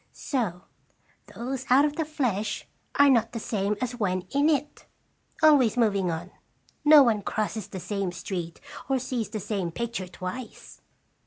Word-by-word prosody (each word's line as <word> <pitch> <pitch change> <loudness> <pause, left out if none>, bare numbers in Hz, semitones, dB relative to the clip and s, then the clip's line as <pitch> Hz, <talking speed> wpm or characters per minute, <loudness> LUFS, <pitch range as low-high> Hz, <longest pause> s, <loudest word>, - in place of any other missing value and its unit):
So 210 - -2 0.7
those 260 +2 -4
out 270 +4 +6
of 295 0 -1
the 320 - -1
flesh 235 -9 -2 0.3
are 285 - +6
not 230 -4 +3
the 230 - -3
same 210 -1 -1
as 250 -1 -2
when 185 -5 0
in 285 +3 +3
it. 295 -1 -1 0.6
Always 265 -8 +5
moving 200 -6 +2
on, 170 +3 -4 0.5
no 295 -1 +9
one 225 -4 +2
crosses 215 0 -3
the 195 -2 -7
same 195 -1 -2
stream 175 -1 -5 0.4
or 270 - +3
sees 245 -3 -3
the 215 0 -4
same 195 -3 -2
picture 235 -2 -4
twice." 185 +7 -8
225 Hz, 155 wpm, -26 LUFS, 195-260 Hz, 0.7 s, no